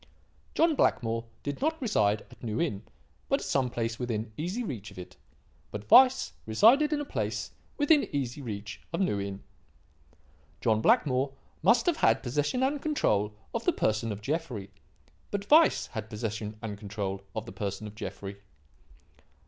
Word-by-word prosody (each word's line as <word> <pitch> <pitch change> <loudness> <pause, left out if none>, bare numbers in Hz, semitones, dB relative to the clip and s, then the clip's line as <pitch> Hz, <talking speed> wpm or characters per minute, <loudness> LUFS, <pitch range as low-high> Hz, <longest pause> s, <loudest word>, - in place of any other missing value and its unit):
"John 330 0 +4
Blackmore 115 - +1 0.2
did 145 - -4
not 320 +2 +1
reside 105 - +2
at 120 - -16
New 110 -1 -2
Inn, 105 -13 -1 0.5
but - - +3
at - - -5
some 130 -2 +1
place 115 -1 -3
within 115 -3 -3
easy 180 - -2
reach 115 - -5
of - - -15
it. 90 - -9 0.5
But 105 0 -8
Weiss 260 0 +7
resided 245 - +5
at 300 - +1
a 290 - -3
place - - -3 0.3
within 290 0 +4
easy 140 -1 -2
reach 105 -4 -6
of 165 - -2
New 180 - +1
Inn. 100 0 -5 1.2
"John 110 -2 +2
Blackmore 135 +2 +3 0.3
must 235 0 +4
have 345 -3 +2
had 115 +1 +3
possession 145 - 0
and 280 +2 0
control 105 - +1 0.2
of - - -2
the - - +3
person 110 +1 0
of 105 0 -5
Jeffrey. 135 - -3 0.6
But 200 0 -3
Weiss 320 +2 +6
had 110 -2 -6
possession 105 -1 -4
and 105 -2 -5
control 100 -2 -4
of 110 0 -3
the - - -8
person 100 0 -4
of 105 - -8
Jeffrey. 100 -2 -6
115 Hz, 165 wpm, -29 LUFS, -, 1.2 s, Weiss